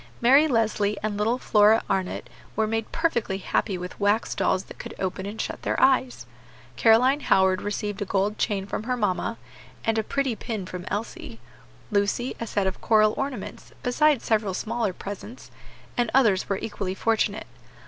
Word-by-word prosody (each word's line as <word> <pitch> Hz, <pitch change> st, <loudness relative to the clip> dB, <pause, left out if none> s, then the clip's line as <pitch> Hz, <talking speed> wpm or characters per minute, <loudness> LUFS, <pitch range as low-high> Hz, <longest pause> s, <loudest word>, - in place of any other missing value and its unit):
Mary 270 Hz, +6 st, +6 dB
Leslie 215 Hz, -5 st, +1 dB
and 215 Hz, -1 st, -1 dB
little 220 Hz, +4 st, +1 dB
Flora 215 Hz, -2 st, +4 dB
Arnott 185 Hz, -9 st, -2 dB, 0.3 s
were 220 Hz, -, +2 dB
made 225 Hz, 0 st, -2 dB
perfectly 235 Hz, -, 0 dB
happy 195 Hz, 0 st, -1 dB
with 180 Hz, +1 st, -7 dB
wax 205 Hz, +3 st, +1 dB
dolls 185 Hz, -, +1 dB
that -, -, -13 dB
could -, -, -7 dB
open 190 Hz, +1 st, -3 dB
and 210 Hz, +2 st, -7 dB
shut -, -, -4 dB
their -, -, -1 dB
eyes; 260 Hz, -1 st, +2 dB, 0.5 s
Caroline 250 Hz, +5 st, +5 dB
Howard 190 Hz, -8 st, +3 dB
received 205 Hz, 0 st, -3 dB
a -, -, 0 dB
gold 200 Hz, +2 st, 0 dB
chain 200 Hz, -3 st, 0 dB
from 200 Hz, -, -4 dB
her 250 Hz, 0 st, -1 dB
mamma, 185 Hz, -, -1 dB, 0.5 s
and 225 Hz, 0 st, +2 dB
a -, -, 0 dB
pretty 270 Hz, +1 st, -1 dB
pin 215 Hz, -4 st, -5 dB
from 180 Hz, -1 st, -7 dB
Elsie; 200 Hz, -, -5 dB, 0.5 s
Lucy, 205 Hz, +5 st, 0 dB
a 230 Hz, -, -4 dB
set 200 Hz, -2 st, 0 dB
of 190 Hz, 0 st, -2 dB
coral 215 Hz, -1 st, +4 dB
ornaments, 275 Hz, -1 st, -5 dB
besides 285 Hz, +2 st, +2 dB
several 210 Hz, -4 st, +1 dB
smaller 225 Hz, 0 st, -1 dB
presents; 205 Hz, +6 st, -9 dB, 0.4 s
and 240 Hz, -, +1 dB
others 215 Hz, -8 st, +3 dB
were 195 Hz, -, +1 dB
equally 195 Hz, -3 st, -4 dB
fortunate. 220 Hz, 0 st, 0 dB
215 Hz, 170 wpm, -25 LUFS, 195-235 Hz, 0.5 s, Mary